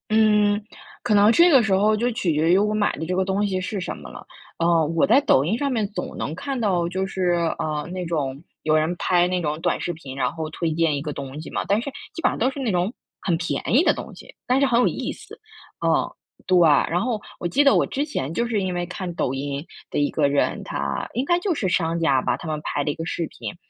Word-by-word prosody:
嗯， 210 Hz, -1 st, +3 dB, 0.4 s
可 -, -, +1 dB
能 205 Hz, +2 st, +6 dB
这 340 Hz, +9 st, +6 dB
个 270 Hz, -7 st, +6 dB
时 210 Hz, -3 st, +1 dB
候 210 Hz, +3 st, +3 dB
就 240 Hz, +3 st, 0 dB
取 185 Hz, -7 st, 0 dB
决 155 Hz, +3 st, +2 dB
于 185 Hz, -, +6 dB
我 210 Hz, +1 st, +2 dB
买 215 Hz, -1 st, +2 dB
的 160 Hz, -, -4 dB
这 180 Hz, +2 st, -2 dB
个 190 Hz, -, +2 dB
东 195 Hz, +2 st, 0 dB
西 185 Hz, -2 st, -1 dB
是 200 Hz, +2 st, -3 dB
什 180 Hz, -, -4 dB
么 -, -, -10 dB
了。 -, -, -11 dB, 0.3 s
呃， 165 Hz, -1 st, +3 dB
我 165 Hz, 0 st, +2 dB
在 280 Hz, -, +5 dB
抖 135 Hz, -, +3 dB
音 205 Hz, +8 st, 0 dB
上 280 Hz, +1 st, -1 dB
面 220 Hz, -5 st, 0 dB
总 -, -, -5 dB
能 155 Hz, -, -3 dB
看 275 Hz, +6 st, -4 dB
到 185 Hz, -6 st, +1 dB
就 190 Hz, +2 st, -2 dB
是， 185 Hz, -2 st, 0 dB, 0.3 s
呃， 150 Hz, -1 st, -3 dB
那 185 Hz, -1 st, -4 dB
种 145 Hz, -4 st, -3 dB, 0.2 s
有 155 Hz, 0 st, +2 dB
人 160 Hz, +3 st, 0 dB
拍 175 Hz, 0 st, +2 dB
那 180 Hz, 0 st, -1 dB
种 155 Hz, -1 st, -2 dB
短 175 Hz, 0 st, 0 dB
视 175 Hz, -, -3 dB
频， 140 Hz, -5 st, -9 dB
然 130 Hz, -2 st, 0 dB
后 160 Hz, -1 st, -4 dB
推 160 Hz, 0 st, -2 dB
荐 160 Hz, -2 st, +1 dB
一 -, -, -4 dB
个 150 Hz, 0 st, -4 dB
东 140 Hz, +1 st, -7 dB
西 -, -, -9 dB
嘛， -, -, -2 dB
但 205 Hz, +3 st, +2 dB
是 280 Hz, -, -5 dB, 0.2 s
基 -, -, -6 dB
本 -, -, +4 dB
上 -, -, -4 dB
都 255 Hz, +4 st, +1 dB
是 280 Hz, -, -8 dB
那 250 Hz, -5 st, 0 dB
种 180 Hz, +4 st, 0 dB, 0.3 s
很 170 Hz, -4 st, 0 dB
便 175 Hz, +1 st, -3 dB
宜 275 Hz, +8 st, +6 dB
的 -, -, +4 dB
东 -, -, -8 dB
西， -, -, -14 dB
但 255 Hz, +2 st, +3 dB
是 280 Hz, -, +4 dB
很 240 Hz, -3 st, +3 dB
有 -, -, +4 dB
意 -, -, -3 dB
思。 -, -, -13 dB, 0.5 s
嗯， -, -, +2 dB, 0.3 s
对。 185 Hz, -1 st, +4 dB
然 165 Hz, +2 st, +4 dB
后 235 Hz, -2 st, -1 dB, 0.2 s
我 175 Hz, -, -2 dB
记 275 Hz, +12 st, +3 dB
得 275 Hz, -, +6 dB
我 -, -, +3 dB
之 280 Hz, +2 st, -2 dB
前 160 Hz, -, -4 dB
就 235 Hz, -, 0 dB
是 220 Hz, -4 st, 0 dB
因 185 Hz, -1 st, -2 dB
为 175 Hz, 0 st, -1 dB
看 180 Hz, 0 st, -5 dB
抖 130 Hz, -, -1 dB
音 140 Hz, +2 st, -4 dB, 0.2 s
的 -, -, -4 dB
一 145 Hz, 0 st, +1 dB
个 150 Hz, -2 st, +2 dB
人， 140 Hz, 0 st, 0 dB
他 -, -, -3 dB
应 255 Hz, -, -1 dB
该 345 Hz, +3 st, +2 dB
就 360 Hz, -2 st, -1 dB
是 200 Hz, -, -1 dB
商 170 Hz, -2 st, 0 dB
家 140 Hz, -6 st, +3 dB
吧， 125 Hz, -, 0 dB
他 150 Hz, -, -8 dB
们 155 Hz, -1 st, -3 dB
拍 145 Hz, -, -1 dB
的 145 Hz, -, 0 dB
一 -, -, -6 dB
个 165 Hz, -, -5 dB
视 170 Hz, 0 st, -2 dB
频。 -, -, -8 dB
180 Hz, 285 characters per minute, -23 LUFS, 155-215 Hz, 0.5 s, 能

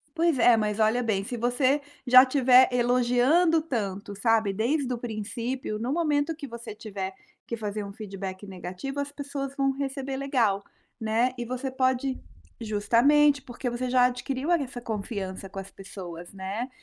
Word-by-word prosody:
Pois 330 Hz, -4 st, +2 dB
é 235 Hz, -1 st, +6 dB
mas 210 Hz, -1 st, -1 dB
olha 220 Hz, +3 st, +3 dB
bem 200 Hz, -4 st, 0 dB
se 245 Hz, -, -4 dB
você 255 Hz, +4 st, +2 dB, 0.3 s
já 255 Hz, +1 st, +9 dB
estiver 260 Hz, -1 st, +5 dB
elogiando 250 Hz, +7 st, +3 dB
tanto 205 Hz, -7 st, -3 dB
sabe, 220 Hz, 0 st, +2 dB
desde 255 Hz, +6 st, 0 dB
o 240 Hz, -, -2 dB
princípio 230 Hz, +1 st, -4 dB
no 245 Hz, +5 st, -2 dB
momento 305 Hz, -1 st, +1 dB
que 295 Hz, -2 st, -7 dB
você 235 Hz, -3 st, -8 dB
tiver 195 Hz, -3 st, -6 dB, 0.3 s
que 235 Hz, -, -3 dB
fazer 210 Hz, -1 st, -4 dB
um 200 Hz, -, -8 dB
feedback 195 Hz, -2 st, -7 dB
negativo 190 Hz, +9 st, -6 dB
as 285 Hz, 0 st, -3 dB
pessoas 280 Hz, -1 st, -5 dB
vão 275 Hz, -1 st, +2 dB
receber 270 Hz, 0 st, -4 dB
legal, 235 Hz, -8 st, +1 dB, 0.4 s
né, 230 Hz, +3 st, +1 dB
e 240 Hz, -, -2 dB
você 255 Hz, +2 st, -3 dB
pode 260 Hz, 0 st, 0 dB, 0.4 s
justamente, 240 Hz, +7 st, +3 dB
porque 245 Hz, -1 st, -5 dB
você 250 Hz, +1 st, -3 dB
já 250 Hz, -1 st, +5 dB
adquiriu 255 Hz, +4 st, -1 dB
essa 275 Hz, -7 st, -1 dB
confiança 200 Hz, -4 st, -5 dB
com 195 Hz, -, -9 dB
as 195 Hz, 0 st, -7 dB
pessoas, 175 Hz, -3 st, -9 dB
né, 195 Hz, +6 st, -4 dB
245 Hz, 160 wpm, -27 LUFS, 210-270 Hz, 0.4 s, já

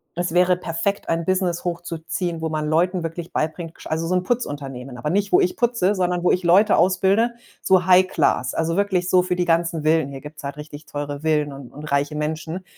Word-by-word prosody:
das 175 Hz, 0 st, -2 dB
wäre 180 Hz, 0 st, +4 dB
perfekt, 180 Hz, +3 st, -3 dB
ein 165 Hz, 0 st, 0 dB
Business 185 Hz, -2 st, 0 dB
hochzuziehen, 170 Hz, -1 st, -4 dB
wo 160 Hz, -, -1 dB
man 155 Hz, -1 st, -2 dB
Leuten 175 Hz, +3 st, +1 dB
wirklich 165 Hz, +1 st, -5 dB
beibringt 160 Hz, +1 st, -3 dB
gesch -, -, -14 dB
also 160 Hz, +1 st, -2 dB
so 185 Hz, -, +1 dB
'n 180 Hz, -, +1 dB
Putzunternehmen, 135 Hz, -, -4 dB
aber 150 Hz, +6 st, -2 dB
nicht, 200 Hz, +2 st, 0 dB
wo 360 Hz, -, +6 dB
ich 365 Hz, -2 st, +1 dB
putze, 235 Hz, -, +1 dB
sondern 180 Hz, -2 st, -1 dB
wo -, -, +4 dB
ich 180 Hz, -, +1 dB
Leute 195 Hz, +5 st, +5 dB
ausbilde 195 Hz, +6 st, +2 dB, 0.3 s
so 185 Hz, -1 st, +3 dB
High-Class, 180 Hz, -9 st, +3 dB
also 165 Hz, +1 st, 0 dB
wirklich 190 Hz, -2 st, 0 dB
so 185 Hz, -, +6 dB
für 180 Hz, 0 st, -1 dB
die 180 Hz, -, 0 dB
ganzen 165 Hz, -1 st, +1 dB
Villen. 155 Hz, -2 st, +2 dB
Hier 135 Hz, -1 st, -8 dB
gibt's 150 Hz, +2 st, -11 dB
halt 140 Hz, +1 st, -5 dB
richtig 150 Hz, 0 st, -10 dB
teure 145 Hz, 0 st, -5 dB
Villen 150 Hz, -2 st, 0 dB
und 135 Hz, -3 st, -11 dB
und 150 Hz, -, -10 dB
reiche 140 Hz, +2 st, 0 dB
Menschen. 160 Hz, +4 st, -3 dB
170 Hz, 210 wpm, -22 LUFS, 155-185 Hz, 0.3 s, wo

